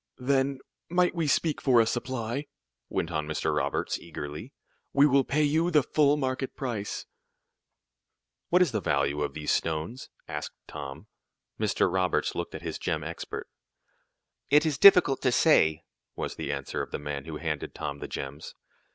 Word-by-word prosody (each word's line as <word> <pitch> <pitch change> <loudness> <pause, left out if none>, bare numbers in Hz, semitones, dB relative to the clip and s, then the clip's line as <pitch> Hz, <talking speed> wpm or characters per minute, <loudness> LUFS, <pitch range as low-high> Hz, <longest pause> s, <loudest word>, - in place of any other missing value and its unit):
"Then 135 +1 +1 0.3
might 180 +1 +3
we 165 -3 -1
speak 155 +1 +1
for 125 -4 +5
a 115 - +5
supply?" 120 +3 -3 0.4
went 85 - -2
on 75 -2 -2
Mr. 80 - -1
Roberts, - - -1
eagerly. 75 - -7 0.4
"We 140 +1 +6
will 140 -2 +4
pay 150 +3 +1
you 160 +4 +2
the 150 -5 +4
full 145 +2 +3
market 130 -1 -2
price." 115 -6 -4 1.4
"What 180 +1 +5
is 165 - -1
the 110 -3 -1
value 70 -2 +1
of 75 - -2
these 75 -1 -1
stones?" 80 +10 -2 0.2
asked 75 0 -5
Tom. 70 +6 -8 0.5
Mr. - - +2
Roberts 95 -1 +1
looked - - -4
at - - -7
his - - -4
gem 80 -2 -1
expert. 85 +2 -6 1.0
"It 150 +3 +5
is 150 -4 0
difficult 180 -8 +7
to 130 - +2
say," 80 - +4 0.3
was - - -3
the - - -4
answer - - -3
of - - -5
the - - -3
man 75 -1 -5
who 80 -1 -6
had - - -12
handed 75 -3 -3
Tom 70 0 -4
the - - -5
gems. 70 +3 -6
120 Hz, 170 wpm, -28 LUFS, -, 1.4 s, difficult